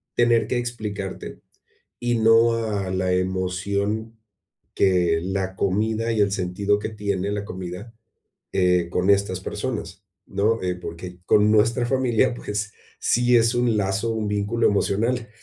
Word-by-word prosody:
tener 120 -1 +3
que 125 - -1
explicarte, 105 -5 -5 0.6
y 120 -1 0
no 115 +1 +5
a 105 -4 -2
la 95 0 0
emoción 100 +4 -2 0.6
que 90 -3 +2
la 95 0 -3
comida 110 +4 0
y 110 - 0
el 100 -1 +2
sentido 100 +2 0
que 105 - -4
tiene 100 -2 -2
la 105 0 -3
comida, 95 +3 -7 0.6
eh, 90 -2 +2
con 90 +2 0
estas 100 -2 +2
personas, 100 - -5 0.2
¿no?, 105 +4 0
eh, 90 -1 -1
porque 90 +1 -8
con 105 0 +4
nuestra 115 +3 +3
familia, 130 -1 +2
pues, 105 -3 -4 0.3
sí 120 +1 +3
es 115 +1 +3
un 120 -2 +2
lazo, 100 +3 0
un 110 -2 -2
vínculo 105 +3 +1
emocional. 115 +4 0
105 Hz, 140 wpm, -23 LUFS, 95-115 Hz, 0.6 s, no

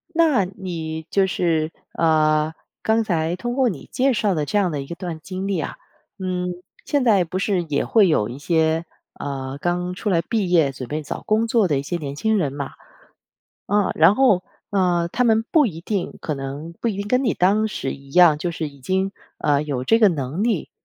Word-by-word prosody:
那 310 - +4
你 165 -4 -6
就 195 -1 +2
是 165 -3 0 0.2
呃， 155 -1 +2 0.3
刚 220 +1 +2
才 170 -4 0
通 240 +7 -3
过 260 -1 +2
你 175 -9 -8
介 265 +1 +2
绍 210 -3 +1
的 155 -3 -1
这 205 - 0
样 190 -4 +2
的 145 -2 -3
一 135 - -8
段 170 -3 -5
经 190 +2 -5
历 195 -4 0
啊。 - - -4 0.4
嗯， 180 -1 -2 0.4
现 285 -2 +1
在 210 -6 +4
不 175 +2 -4
是 190 -2 0
也 150 -4 -1
会 215 -4 +4
有 130 -11 +2
一 125 +3 -7
些， 160 +1 +1 0.3
呃， 135 -1 -4
刚 180 +2 -1
出 205 +3 -3
来 170 -4 +3
毕 215 -5 -1
业 165 -6 +4
准 130 -2 -7
备 155 +1 -3
找 145 - -5
工 220 +2 +2
作 225 -3 +3
的 145 -4 +1
一 135 - -2
些 175 +4 -3
年 140 -4 -5
轻 220 +7 +1
人 150 -7 0
嘛。 140 -1 -5 1.0
啊， 205 -1 +2
然 165 +5 +6
后， 215 -8 +4 0.3
呃， 180 -3 +1
他 250 - +1
们 225 -1 +3
不 310 -3 +5
一 165 -7 -5
定 195 +1 -3
可 155 - -2
能 140 +4 -6
不 235 - 0
一 210 - -2
定 200 +1 -4
跟 250 +4 +2
你 225 - +1
当 205 +4 +3
时 135 - -3
一 140 0 -13
样， 175 -1 +6
就 175 +3 -2
是 165 -2 -4
已 140 -1 -17
经， 190 +7 0 0.3
呃， 145 0 +2
有 135 -4 -3
这 225 - +4
个 215 -3 +6
能 150 +1 -2
力 220 -8 0
175 Hz, 225 characters per minute, -22 LUFS, 155-205 Hz, 1.0 s, 然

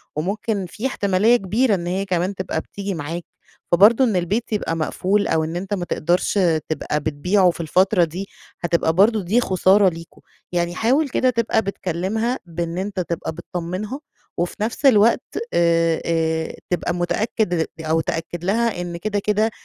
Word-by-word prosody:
وممكن 200 +5 -2
في 235 +8 -3
احتمالية 205 0 +2
كبيرة 215 +3 +1
إن 175 -2 -4
هيّ 190 +2 -1
كمان 185 +1 -1
تبقى 180 -4 -3
بتيجي 200 -1 -5
معاك، 165 +1 -5 0.5
فبرضو 210 +9 +6
إن 225 -6 +2
البيت 200 +7 -1
يبقى 200 -5 -1
مقفول 190 +5 0
أو 160 -1 +1
إن 160 +2 -4
أنتَ 190 +3 -4
ما 180 -3 -2
تقدرش 175 +5 0
آآ 165 -5 +3
تبقى 150 -1 -1
بتبيعه 180 +6 +2
في 170 - -7
الفترة 185 +4 +3
دي، 175 +4 -4 0.3
هتبقى 170 -2 +1
برضو 210 +5 +4
دي 205 +7 +2
خسارة 190 0 +4
ليكم. 165 0 -11 0.3
يعني 175 0 -1
حاول 270 +8 +2
كده 255 - +2
تبقى 230 -2 +1
بتكلمها 195 +5 -2
بإن 170 0 -4
أنتَ 190 0 -3
تبقى 170 -2 -3
بتطمنها 180 - -5 0.4
وفي 175 +1 -1
نفس 235 +6 -2
الوقت، 225 -3 +5 0.3
آآ، 165 -1 +2
آآ 160 -1 0
تبقى 175 -1 -1
متأكّد 175 -1 0 0.2
أو 160 +1 +1
تأكد 165 +1 -4
لها 215 0 0
إن 175 -1 -5
كده، 205 +3 -2
كده 210 +2 +1
185 Hz, 160 wpm, -21 LUFS, 170-210 Hz, 0.5 s, فبرضو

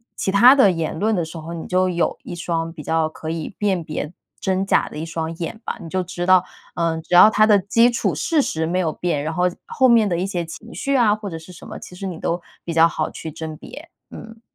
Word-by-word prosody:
其 190 - -1
他 240 +7 +7
的 210 -8 +5
言 165 -2 -3
论 215 +5 +1
的 175 - 0
时 165 +1 -8
候， 160 +1 -7
你 165 - -6
就 185 0 +2
有 175 -1 0
一 - - -7
双 165 -1 -3
比 155 - -9
较 160 +1 0
可 155 0 -8
以 165 +3 -4
辨 195 -4 0
别 155 0 -5 0.3
真 190 0 0
假 - - +2
的 - - -9
一 160 - -4
双 165 0 -4
眼 175 +6 -5
吧。 - - -4
你 165 - -8
就 185 +2 -1
知 175 0 -5
道， 185 -1 +5 0.3
嗯， 165 -1 -1
只 170 - -7
要 180 - +9
它 215 0 +4
的 210 -2 +5
基 230 +5 +3
础 215 -6 0
事 295 - +1
实 160 -11 -2
没 175 +3 -1
有 165 -4 0
变， 160 -5 -2
然 160 - -3
后 180 +2 0 0.2
后 260 - +3
面 230 -3 +5
的 170 - 0
一 180 - -1
些 180 -3 -2
情 165 +8 -10
绪 275 0 -1
啊， 225 -5 +4
或 215 -2 -7
者 165 - -6
是 160 +3 -12
什 175 - -12
么， - - -7
其 180 - -11
实 195 +2 -5
你 175 -3 -5
都 175 +1 -2 0.2
比 170 - -5
较 165 +1 +6
好 - - -2
去 160 - -7
甄 160 0 -7
别， - - -11 0.2
嗯。 225 0 -11
175 Hz, 280 characters per minute, -21 LUFS, 165-200 Hz, 0.3 s, 要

